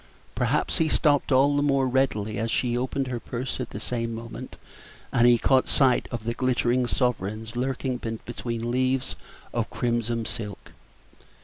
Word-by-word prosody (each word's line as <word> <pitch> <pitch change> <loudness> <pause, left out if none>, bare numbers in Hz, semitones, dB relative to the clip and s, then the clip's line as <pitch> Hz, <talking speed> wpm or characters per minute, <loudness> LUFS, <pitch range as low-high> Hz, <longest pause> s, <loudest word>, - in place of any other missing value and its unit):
Perhaps - - 0
he 160 -1 +3
stopped 145 -3 +2
all 140 +2 +5
the 145 - +2
more 135 -2 +2
readily 110 -5 0
as 115 +1 -1
she 120 +1 +1
opened 130 +2 -1
her 125 -2 -3
purse 125 +3 -4
at 125 - -3
the 105 - -6
same 115 0 -2
moment, 115 +1 -8 0.6
and 120 0 +5
he 120 -1 +6
caught 130 +3 +3
sight 130 -3 +3
of 120 -3 -5
the 115 +1 -1
glittering 125 0 +1
sovereigns 110 -3 -1
lurking 130 0 -1 0.3
between 120 -1 -3
leaves 130 +1 0 0.4
of - - -1
crimson 115 -1 -1
silk. 105 -4 -5
125 Hz, 155 wpm, -26 LUFS, 115-130 Hz, 0.6 s, he